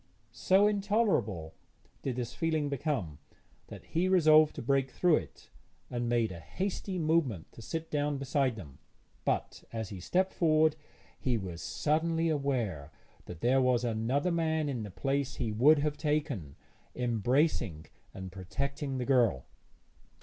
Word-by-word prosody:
So 190 +2 +3
intolerable 200 - +1 0.5
did 130 -3 -2
this 120 -2 -4
feeling 160 -3 0
become 130 - -2 0.5
that - - -10
he 180 +3 0
resolved 155 -4 +6
to - - -5
break 135 +1 +1
through 175 +3 +3
it, - - -9 0.4
and 120 -1 -2
made 115 -3 +1
a 85 - -8
hasty 190 - -4
movement 155 - 0
to - - -12
sit 160 +7 -5
down 145 -1 0
beside 135 -2 0
them; 75 -10 -11 0.5
but, - - -1
as 110 -3 -4
he 100 - -7
stepped 185 - 0
forward, 155 -2 +3 0.4
he 125 -3 0
was 90 -5 -6
suddenly 165 +2 0
aware 120 - -1 0.3
that 85 -2 -9
there 130 +2 +3
was 125 -2 +2
another 120 +8 0
man 160 -2 0
in 125 -5 -3
the 105 - -6
place 135 +6 -2
he 115 -3 -2
would 135 +9 +5
have 150 0 -1
taken, 145 - -2 0.4
embracing 120 - 0 0.3
and 95 -1 -8
protecting 135 +9 -4
the 125 - -2
girl. 120 - +2
135 Hz, 145 wpm, -31 LUFS, 110-155 Hz, 0.5 s, resolved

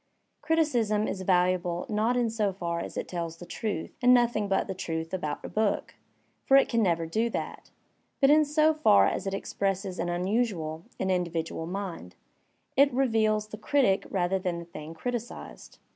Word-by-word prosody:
Criticism 240 -10 +1
is 190 - -4
valuable 180 -1 +1
not 220 +3 +1
in 240 -1 +2
so 215 -3 0
far 170 -3 -3
as - - -6
it - - -3
tells 170 -2 -4
the 175 - -10
truth 200 -3 -4
and 250 0 +6
nothing 235 -4 +2
but 195 -1 +1
the 190 - -4
truth 165 -2 -4
about 155 -6 -3
a - - -3
book 215 -1 -1 0.5
(for 270 - +6
it 275 - +5
can. 230 -1 +1
never 170 -5 +1
do 220 +8 0
that), - - -5 0.5
but 275 0 +5
in 305 +1 +6
so 305 +1 +3
far 100 - +5
as - - -1
it 195 - -1
expresses 195 -1 -2
an 170 +1 -1
unusual, 175 -4 -1
an 190 - -1
/^ 185 - +3
individual 165 -2 -3
mind; 180 - -6 0.6
it 280 +1 +5
reveals 220 -4 +1
the 215 - -8
critic 245 -6 +2
rather 190 0 0
than 180 -2 -2
the 170 - -7
thing 160 -1 -9
criticised. 240 +5 -6
195 Hz, 180 wpm, -28 LUFS, 175-230 Hz, 0.6 s, and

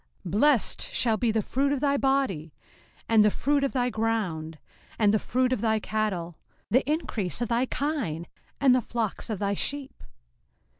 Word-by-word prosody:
05:028:004 175 - -5
Blessed 245 +4 +2
shall 225 -3 +1
be 235 -1 +1
the 220 0 +1
fruit 275 +6 0
of 285 - 0
thy 280 0 +2
body, 265 - 0 0.5
and 220 -2 +5
the 210 - +5
fruit 285 +6 0
of 275 - +1
thy 250 -2 0
ground, 190 -9 -2 0.4
and 210 -2 +3
the 215 - +3
fruit 255 +3 0
of - - -2
thy 220 -1 +2
cattle, 195 -7 -3 0.3
the 255 +5 +4
increase 245 - -2
of 240 -2 -2
thy 240 +2 +1
kine, 255 - -2 0.3
and 265 -2 +5
the 255 - +3
flocks 225 -1 -3
of 215 - -2
thy 200 +1 -1
sheep. 275 +6 -3
225 Hz, 180 wpm, -27 LUFS, 205-270 Hz, 0.5 s, and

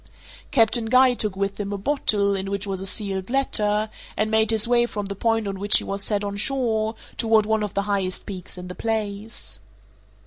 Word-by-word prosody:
Captain 225 -1 +2
Guy 255 +2 +5
took 215 -5 -1
with 195 +1 -2
him 205 -1 -3
a 200 - -2
bottle, 200 -4 +1
in 195 0 -3
which 200 0 -3
was 195 -2 -1
a 195 - -2
sealed 195 -1 0
letter, 215 -5 +2 0.3
and 215 +1 0
made 220 0 +3
his 220 0 +4
way 240 0 +3
from 205 -3 -4
the 200 0 -5
point 225 +1 0
on 195 -1 -4
which 205 +1 +5
he - - +1
was 200 0 -3
set 205 -1 0
on 200 0 -4
shore 225 -2 0 0.2
toward 220 -2 +3
one 220 0 +1
of 210 -2 -4
the 200 - +1
highest 195 -2 -2
peaks 185 -2 -8
in 180 0 -7
the 180 - -6
place. 215 - -3
210 Hz, 210 wpm, -23 LUFS, 200-225 Hz, 0.3 s, Guy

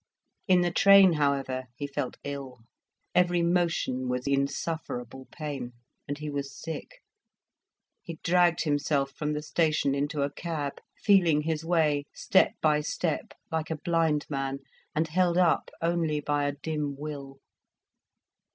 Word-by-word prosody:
In 185 -2 +5
the 175 0 +1
train, 195 0 +7
however, 135 -3 0
he 145 - -4
felt 140 -2 -4
ill. 135 -4 -6 0.5
Every 175 -1 +3
motion 170 -7 0
was 125 0 -2
insufferable 140 -2 -2
pain, 140 -6 -5 0.3
and 145 - -3
he 150 0 -6
was 140 -1 -4
sick. 335 - -7 1.0
He 165 -1 -8
dragged 175 -1 +3
himself 145 -2 0
from 150 +2 -3
the 150 0 -3
station 155 -3 +1
into 145 +1 -1
a 140 - -1
cab, 155 -5 -4 0.2
feeling 175 -7 +5
his 160 0 -2
way 155 -4 +2
step - - +3
by 150 -1 +3
step, 155 +1 -2 0.2
like 160 -1 -2
a 160 - -2
blind 160 -2 +1
man, 135 -1 -3 0.3
and 160 +1 +1
held 175 +2 +2
up 180 -2 +3
only 165 -3 +1
by 145 0 0
a 145 - 0
dim 145 -1 -3
will. 140 -2 -7
150 Hz, 140 wpm, -28 LUFS, 140-165 Hz, 1.0 s, train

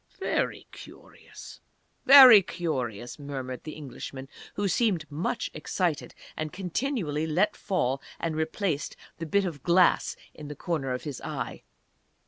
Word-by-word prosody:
"Very - - -1
curious!... - - -13 0.5
Very 260 -6 +11
curious!" 125 - -4
murmured 135 -3 -6
the 155 - -6
Englishman, 135 -2 -8 0.3
who 205 0 0
seemed 190 -4 +1
much 155 +5 -3
excited, 160 +1 -2 0.2
and 155 -1 -4
continually 180 - -2
let 175 +7 +1
fall 135 -8 -1 0.2
and 165 -2 -2
replaced 160 0 -2 0.2
the 165 - -5
bit 200 +4 +2
of 160 -6 -5
glass 175 +3 +3 0.2
in 150 - -10
the 150 - -7
corner 155 -7 -3
of 125 - -3
his 145 -4 -6
eye. - - -5
160 Hz, 130 wpm, -27 LUFS, 145-185 Hz, 0.5 s, Very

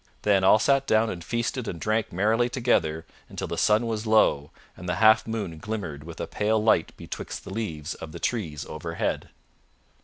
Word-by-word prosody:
Then 100 -2 +3
all 95 +3 +7
sat 135 +4 +2
down 110 0 +3
and 85 -2 -7
feasted 120 +2 -2
and 85 - -4
drank 110 +3 0
merrily 110 +6 +2
together 85 -11 0 0.2
until - - -5
the - - -3
sun 110 +2 +3
was 110 -1 -3
low 75 -10 +3 0.3
and 90 -1 -7
the 90 - 0
half 110 +1 +5
moon 100 -8 -4
glimmered 90 -9 -5
with 85 -1 -9
a - - -2
pale 110 +1 0
light 105 -6 +3
betwixt - - -7
the - - -8
leaves 85 -7 -4
of 80 - -9
the - - -8
trees 80 - -2
overhead. 85 +2 -3
105 Hz, 185 wpm, -26 LUFS, 85-110 Hz, 0.3 s, all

